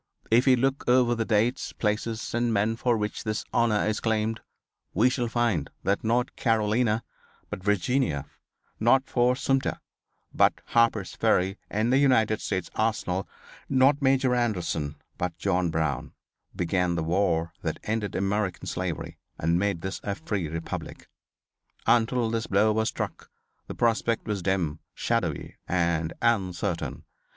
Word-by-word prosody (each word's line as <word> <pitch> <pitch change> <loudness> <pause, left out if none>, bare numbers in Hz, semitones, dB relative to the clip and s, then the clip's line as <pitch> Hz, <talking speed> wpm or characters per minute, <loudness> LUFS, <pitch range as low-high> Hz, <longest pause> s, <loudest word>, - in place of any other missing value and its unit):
If 120 +4 +4
we 130 - +7
look 135 +2 0
over 125 -1 +4
the 115 -1 -1
dates, 115 +3 +1
places 110 +1 -2
and 120 0 +1
men 110 +1 +1
for 120 0 +1
which 105 0 -3
this 110 -1 -2
honor 115 -3 +2
is 110 -1 0
claimed 110 0 0 0.6
we 120 +7 +4
shall 125 -2 -1
find 115 - 0
that 100 +1 0
not 120 +3 0
Carolina, 115 0 +1 0.5
but 95 - -5
Virginia; 100 - +1 0.5
not 130 +4 +4
Fort 125 0 +2
Sumter, 135 0 0 0.5
but - - +4
Harper's 115 -4 +2
Ferry 95 +2 +1
and 110 +4 +1
the 135 - +5
United 110 -6 +3
States 95 -2 -3
Arsenal; 105 -4 -1 0.4
not 135 +2 +4
Major 130 -1 +3
Anderson, 90 -11 -1 0.2
but 85 -2 -2
John 90 -2 +1
Brown, 80 -5 -2 0.4
began 90 0 0
the 80 - -1
war 85 -1 +1
that - - -2
ended 110 -3 -2
American 100 -1 -1
slavery - - -4 0.2
and 85 +2 +1
made 100 -4 0
this 95 +1 -4
a 100 - -2
free 105 - -3
republic. 80 +2 -6 0.8
Until 120 0 +3
this 115 0 -1
blow 105 +2 +3
was 110 +1 +1
struck - - -5 0.4
the - - -6
prospect 115 0 +1
was 105 -3 -2
dim, 85 -5 0 0.2
shadowy - - -2
and 85 -2 +1
uncertain. 95 -6 0
110 Hz, 145 wpm, -27 LUFS, 90-120 Hz, 0.8 s, we